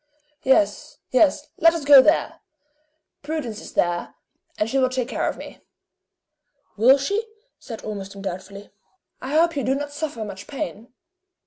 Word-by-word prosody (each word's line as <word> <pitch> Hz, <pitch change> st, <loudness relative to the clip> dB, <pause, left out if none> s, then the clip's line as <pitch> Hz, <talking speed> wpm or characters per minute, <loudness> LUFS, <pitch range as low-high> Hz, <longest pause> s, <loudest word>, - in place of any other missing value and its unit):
"Yes. 265 Hz, +4 st, +1 dB
Yes. 290 Hz, +2 st, +3 dB
Let 330 Hz, +1 st, +5 dB
us 315 Hz, -4 st, -4 dB
go 285 Hz, -2 st, +10 dB
there! 310 Hz, +5 st, +1 dB, 0.8 s
Prudence 285 Hz, -8 st, -4 dB
is -, -, -11 dB
there, 175 Hz, 0 st, -1 dB, 0.4 s
and 210 Hz, -, 0 dB
she 270 Hz, +4 st, 0 dB
will 255 Hz, -1 st, +3 dB
take 255 Hz, -2 st, -2 dB
care -, -, -1 dB
of -, -, -6 dB
me.". -, -, -10 dB, 1.2 s
"Will 250 Hz, +6 st, +6 dB
she?" 400 Hz, +11 st, -1 dB, 0.4 s
said 225 Hz, -4 st, -9 dB
Ormiston, 195 Hz, -2 st, -7 dB
doubtfully. 195 Hz, +2 st, -7 dB, 0.5 s
"I 270 Hz, +3 st, -4 dB
hope 335 Hz, +1 st, +3 dB
you 280 Hz, -, -1 dB
do 265 Hz, -, +1 dB
not 290 Hz, +1 st, -4 dB
suffer 285 Hz, -7 st, -4 dB
much 195 Hz, -1 st, -9 dB
pain!" 265 Hz, -5 st, -6 dB
260 Hz, 150 wpm, -23 LUFS, 210-295 Hz, 1.2 s, go